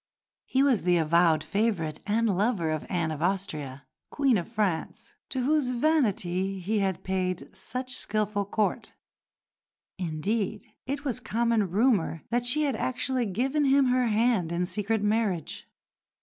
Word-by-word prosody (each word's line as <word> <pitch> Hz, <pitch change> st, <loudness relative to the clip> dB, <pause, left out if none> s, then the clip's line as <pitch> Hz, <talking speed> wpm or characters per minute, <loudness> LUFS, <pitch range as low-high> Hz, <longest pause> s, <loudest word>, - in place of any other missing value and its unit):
He 265 Hz, +1 st, +2 dB
was 265 Hz, -6 st, +3 dB
the 175 Hz, 0 st, +3 dB
avowed 165 Hz, 0 st, +3 dB
favourite 200 Hz, -8 st, -1 dB
and 225 Hz, +2 st, +2 dB
lover 195 Hz, -5 st, +1 dB
of 155 Hz, -1 st, -3 dB
Anne 170 Hz, -3 st, 0 dB
of 155 Hz, -1 st, -5 dB
Austria, 155 Hz, -8 st, -2 dB, 0.2 s
Queen 275 Hz, -4 st, +2 dB
of 175 Hz, -5 st, -1 dB
France, 210 Hz, -7 st, -2 dB, 0.2 s
to 260 Hz, -2 st, -2 dB
whose 295 Hz, -2 st, +2 dB
vanity 200 Hz, -, +1 dB
he 210 Hz, +4 st, -1 dB
had 190 Hz, -2 st, -1 dB
paid 185 Hz, -1 st, -2 dB
such 255 Hz, +6 st, -4 dB
skilful 210 Hz, -1 st, -1 dB
court 210 Hz, +1 st, -1 dB, 1.1 s
indeed 200 Hz, +6 st, -2 dB, 0.2 s
it 280 Hz, +2 st, -3 dB
was 250 Hz, -3 st, -1 dB
common 230 Hz, -4 st, +1 dB
rumour 195 Hz, -, +1 dB
that 240 Hz, +1 st, 0 dB
she 305 Hz, +5 st, +2 dB
had 275 Hz, -4 st, 0 dB
actually 255 Hz, +1 st, -1 dB
given 265 Hz, +9 st, 0 dB
him 270 Hz, -1 st, +4 dB
her 250 Hz, -1 st, +2 dB
hand 220 Hz, -6 st, +2 dB
in 175 Hz, +1 st, 0 dB
secret 210 Hz, +3 st, -1 dB
marriage. 210 Hz, -6 st, -1 dB
210 Hz, 145 wpm, -27 LUFS, 180-245 Hz, 1.1 s, him